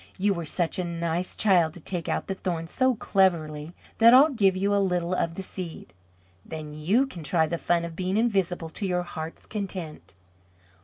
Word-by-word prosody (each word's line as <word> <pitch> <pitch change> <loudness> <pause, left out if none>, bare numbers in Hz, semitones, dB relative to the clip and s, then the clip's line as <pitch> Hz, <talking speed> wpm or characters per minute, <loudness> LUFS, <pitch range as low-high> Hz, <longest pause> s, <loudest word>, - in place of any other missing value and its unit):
You 200 +1 +2
were 170 -3 -5
such 175 +3 -1
a - - 0
nice 170 +1 -2
child 175 -7 +3
to - - -9
take 175 +1 -4
out - - -1
the 195 - -3
thorn 175 -3 -3
so 260 +9 +1
cleverly, 170 -7 0 0.2
that 230 +2 +8
I'll 290 +4 +7
give 200 -7 +3
you 200 +2 +1
a 200 - +3
little 180 -1 0
of 170 -2 -1
the 195 - -5
seed. 170 - -8 0.5
Then 155 -2 -7
you 185 - +2
can 185 -11 -9
try 160 +1 +2
the 170 +1 -3
fun 170 -1 +1
of 165 -1 -8
being 185 +3 -1
invisible, 190 -7 0
to 195 +4 -4
your 180 -1 0
heart's 160 -2 -7
content." 185 - -4
180 Hz, 195 wpm, -26 LUFS, 165-195 Hz, 0.5 s, that